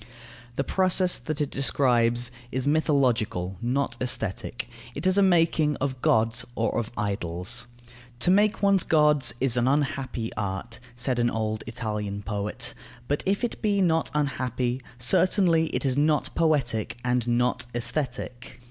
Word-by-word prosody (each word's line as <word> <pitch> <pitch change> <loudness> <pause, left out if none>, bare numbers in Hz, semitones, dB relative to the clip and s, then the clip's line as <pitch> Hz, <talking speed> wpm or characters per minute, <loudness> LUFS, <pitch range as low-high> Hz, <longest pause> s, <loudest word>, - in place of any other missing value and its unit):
The 140 - 0
process 185 +2 +2
that 155 -1 -4
it 145 - -1
describes 120 -3 +2 0.2
is 130 +1 -1
mythological, 125 - +1
not 130 +4 -1
aesthetic; 110 -6 -2 0.3
it - - -4
is 185 0 +4
a 200 - +6
making 165 -5 +3
of 130 -2 -3
gods 115 +2 +2
or 115 - 0
of 115 -1 -4
idols. 100 +2 -2 0.5
"To 180 - +4
make 205 +2 +3
one's 200 -2 +4
gods 150 -5 +3
is 125 -2 +1
an 120 +1 +2
unhappy 135 -4 -1
art," 100 +3 -4 0.2
said 125 0 -1
an 120 0 +3
old 110 -1 -2
Italian 105 -3 -4
poet; 105 +4 -3 0.3
but 145 - 0
if 200 +4 +1
it 240 - -2
be 205 -2 +1
not 165 -4 +2
unhappy, 130 -3 -1 0.2
certainly 165 - +3
it - - -2
is 135 0 +1
not 150 +1 +1
poetic 130 -10 +1
and 125 -1 +1
not 120 +1 +1
aesthetic. 125 0 -4
125 Hz, 145 wpm, -26 LUFS, 115-155 Hz, 0.5 s, a